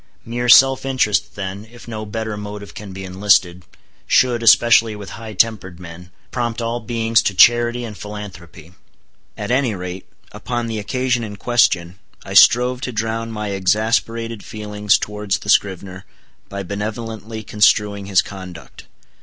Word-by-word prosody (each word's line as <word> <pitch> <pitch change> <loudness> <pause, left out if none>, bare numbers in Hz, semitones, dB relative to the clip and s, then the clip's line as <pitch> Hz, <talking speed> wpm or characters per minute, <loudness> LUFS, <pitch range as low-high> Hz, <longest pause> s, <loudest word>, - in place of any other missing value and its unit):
Mere 120 +1 -3
self 135 +1 +6
interest, 130 -6 0
then, 100 +2 -6
if 120 -1 -14
no 110 -2 -6
better 110 0 -4
motive 105 0 -8
can 100 -2 -9
be 95 +1 -8
enlisted, 95 -1 +1 0.4
should, 120 -2 +3
especially 115 -1 +5
with 100 -2 -9
high 110 -1 -8
tempered 95 -4 0
men, 90 0 -11 0.2
prompt 120 -2 -2
all 115 +1 -2
beings 115 0 +1
to 100 - -2
charity 120 +3 +4
and 110 -2 -8
philanthropy. 95 -6 -10 0.6
At - - -4
any 125 -4 +1
rate, 90 0 -7 0.2
upon 120 -1 -4
the 115 -2 -4
occasion 125 +3 -1
in 105 -2 -7
question, 95 -6 +1 0.3
I - - -7
strove 125 +1 +5
to 125 - -4
drown 115 0 -3
my 105 -1 -4
exasperated 110 +3 -1
feelings 105 -1 0
towards 105 -1 -3
the 105 - -9
scrivener 95 -1 0 0.4
by 100 0 -5
benevolently 110 +2 -6
construing 105 -1 +1
his 100 -2 +3
conduct. 95 -4 -11
105 Hz, 145 wpm, -19 LUFS, 100-115 Hz, 0.6 s, self